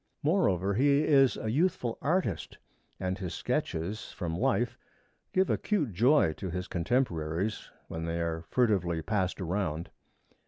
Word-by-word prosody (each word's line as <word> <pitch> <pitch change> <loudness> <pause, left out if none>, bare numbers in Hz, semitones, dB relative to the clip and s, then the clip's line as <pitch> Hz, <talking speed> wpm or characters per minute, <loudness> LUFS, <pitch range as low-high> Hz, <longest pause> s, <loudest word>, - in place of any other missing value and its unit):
Moreover, 100 - +2
he 140 +6 +4
is 135 -6 +4
a 110 - -2
youthful 135 -5 0
artist 150 - -1 0.4
and 95 0 -1
his 90 -3 -4
sketches 90 +7 -2
from 85 -3 -4
life 115 +7 +1 0.6
give 190 0 +3
acute 155 - 0
joy 120 - +4
to 95 - -4
his 90 +1 -4
contemporaries 90 -1 -1 0.2
when 80 0 -5
they 85 0 -2
are 80 -1 -1
furtively 90 -9 +1
passed 95 0 -1
around. 90 -3 -2
100 Hz, 130 wpm, -30 LUFS, 85-130 Hz, 0.6 s, he